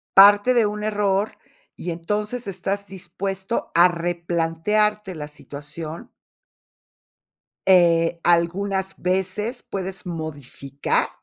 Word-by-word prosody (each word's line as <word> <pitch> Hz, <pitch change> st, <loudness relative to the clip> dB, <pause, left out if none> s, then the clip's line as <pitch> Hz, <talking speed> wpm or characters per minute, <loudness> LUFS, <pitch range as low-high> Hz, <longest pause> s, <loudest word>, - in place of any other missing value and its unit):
Parte 205 Hz, +5 st, +8 dB
de 235 Hz, -3 st, +4 dB
un 210 Hz, 0 st, -3 dB
error, 210 Hz, 0 st, 0 dB, 0.4 s
y 175 Hz, -, -4 dB
entonces 210 Hz, +8 st, -3 dB
estás 195 Hz, +1 st, -3 dB
dispuesto 195 Hz, +2 st, -4 dB
a 175 Hz, +1 st, +7 dB
replantearte 175 Hz, +4 st, 0 dB
la 150 Hz, -2 st, -6 dB
situación. 150 Hz, +2 st, -8 dB, 1.6 s
Eh, 170 Hz, -2 st, +4 dB
algunas 190 Hz, +3 st, +1 dB
veces 190 Hz, +6 st, -1 dB
puedes 190 Hz, 0 st, -5 dB
modificar. 145 Hz, -4 st, -2 dB
190 Hz, 90 wpm, -23 LUFS, 170-205 Hz, 1.6 s, Parte